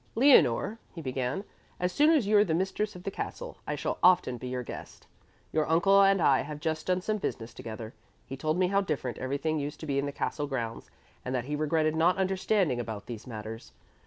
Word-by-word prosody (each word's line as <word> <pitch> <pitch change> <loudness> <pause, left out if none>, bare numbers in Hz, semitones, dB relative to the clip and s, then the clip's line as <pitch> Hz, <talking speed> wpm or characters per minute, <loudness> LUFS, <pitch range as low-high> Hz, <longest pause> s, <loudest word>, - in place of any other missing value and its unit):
"Leonore," 225 - +5 0.2
he - - -6
began, 130 +4 -2 0.4
"as 180 0 0
soon 295 +10 +4
as 305 -9 +4
you 210 +1 +2
are 205 - +7
the 165 -6 0
mistress 190 +3 -1
of 180 - -10
the 195 - -3
castle, - - -6
I - - -1
shall - - -3
often 175 -9 +4
be 130 - -6
your 125 0 -3
guest. - - -9 0.5
Your 155 -1 0
uncle 195 +5 +5
and 195 0 +5
I 140 -5 +4
have 150 +1 -6
just 155 +1 -2
done 185 0 +1
some 215 +3 -1
business 115 - -4
together. 115 -2 -7 0.3
He 135 - -6
told 155 +4 -1
me 180 -1 +2
how 200 +1 +3
different 140 - -3
everything 140 +4 -1
used 145 +1 -5
to - - -5
be 140 -2 0
in 140 - -1
the - - -3
castle 145 +1 -2
grounds 120 -5 -4 0.3
and 130 +1 -3
that 125 -1 -1
he 150 +2 -2
regretted 155 +1 +1
not 170 +3 +3
understanding 190 - +1
about 110 -3 -5
these 120 0 -8
matters. 110 - -8
155 Hz, 220 wpm, -29 LUFS, 130-190 Hz, 0.5 s, are